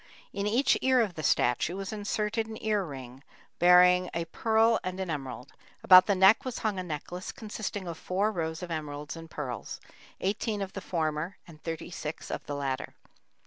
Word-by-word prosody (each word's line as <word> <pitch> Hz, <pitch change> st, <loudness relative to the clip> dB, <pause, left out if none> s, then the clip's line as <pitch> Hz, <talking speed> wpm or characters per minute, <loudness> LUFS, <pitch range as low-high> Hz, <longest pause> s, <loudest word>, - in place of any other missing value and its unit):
In 200 Hz, 0 st, -2 dB
each 240 Hz, +6 st, +3 dB
ear 260 Hz, -1 st, +4 dB
of 215 Hz, -6 st, +1 dB
the 155 Hz, -, -6 dB
statue 140 Hz, +4 st, +2 dB
was 195 Hz, +1 st, -5 dB
inserted 215 Hz, +1 st, -1 dB
an 220 Hz, -1 st, -7 dB
ear 210 Hz, -2 st, +1 dB
ring 130 Hz, -5 st, -9 dB, 0.4 s
bearing 180 Hz, +1 st, +6 dB
a 165 Hz, 0 st, -1 dB
pearl 225 Hz, +6 st, +2 dB
and 185 Hz, +1 st, -4 dB
an 185 Hz, -3 st, -2 dB
emerald; 130 Hz, -3 st, -6 dB, 0.3 s
about 185 Hz, -1 st, +9 dB
the 200 Hz, -, +3 dB
neck 190 Hz, +7 st, +6 dB
was 255 Hz, -3 st, -4 dB
hung 205 Hz, -3 st, 0 dB
a -, -, -3 dB
necklace 175 Hz, +3 st, -5 dB
consisting 210 Hz, -3 st, -5 dB
of 165 Hz, -2 st, -6 dB
four 200 Hz, +4 st, 0 dB
rows 160 Hz, -2 st, -3 dB
of 175 Hz, -, -6 dB
emeralds 150 Hz, -1 st, -5 dB
and 165 Hz, 0 st, -10 dB
pearls, 130 Hz, -6 st, -5 dB, 0.4 s
eighteen 205 Hz, +1 st, -1 dB
of 190 Hz, -, -7 dB
the 195 Hz, -, -5 dB
former 160 Hz, +1 st, -2 dB
and 155 Hz, -3 st, -14 dB
thirty 165 Hz, +1 st, -5 dB
six 155 Hz, -2 st, -6 dB
of -, -, -4 dB
the 145 Hz, -, -3 dB
latter. 135 Hz, -2 st, -3 dB
180 Hz, 185 wpm, -29 LUFS, 155-205 Hz, 0.4 s, about